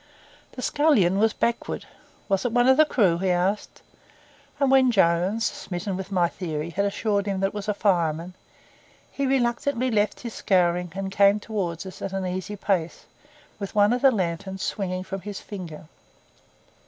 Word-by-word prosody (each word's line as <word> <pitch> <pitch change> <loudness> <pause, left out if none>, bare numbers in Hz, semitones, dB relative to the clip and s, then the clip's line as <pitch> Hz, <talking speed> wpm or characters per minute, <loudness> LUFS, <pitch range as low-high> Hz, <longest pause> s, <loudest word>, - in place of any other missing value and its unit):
The 255 - -7
scullion 215 - +3
was 220 +1 +4
backward. 235 +1 -2 0.4
'Was 195 -2 +1
it 245 - -1
one 245 +1 +3
of 265 - +7
the 310 +2 +6
crew?' 195 - +2
he 190 0 0
asked. 180 +3 -1 0.8
And 275 -2 +3
when 265 -1 +5
Jones, 190 +1 +2
smitten 185 +2 -4
with 190 +1 -6
my 180 -3 +3
theory, 165 -2 -5
had 200 +5 0
assured 205 0 -1
him 195 -1 -1
that 195 - +2
it - - -17
was 205 -1 -5
a 210 - 0
fireman, 170 -4 0 0.8
he 280 -1 -1
reluctantly 255 0 0
left 210 -1 0
his 235 -3 -6
scouring 180 -2 +1
and 195 0 -4
came 200 +1 +4
towards 195 -6 -4
us 190 - -10
at 195 - -4
an 190 -1 -2
easy 185 +3 -4
pace, 185 -5 -2 0.5
with 200 +1 -6
one 205 +2 +5
of 250 - -1
the 275 - +7
lanterns 190 -2 -2
swinging 185 -2 -2
from 195 0 -6
his 205 +1 -6
finger. 175 -6 -8
195 Hz, 175 wpm, -25 LUFS, 180-220 Hz, 0.8 s, of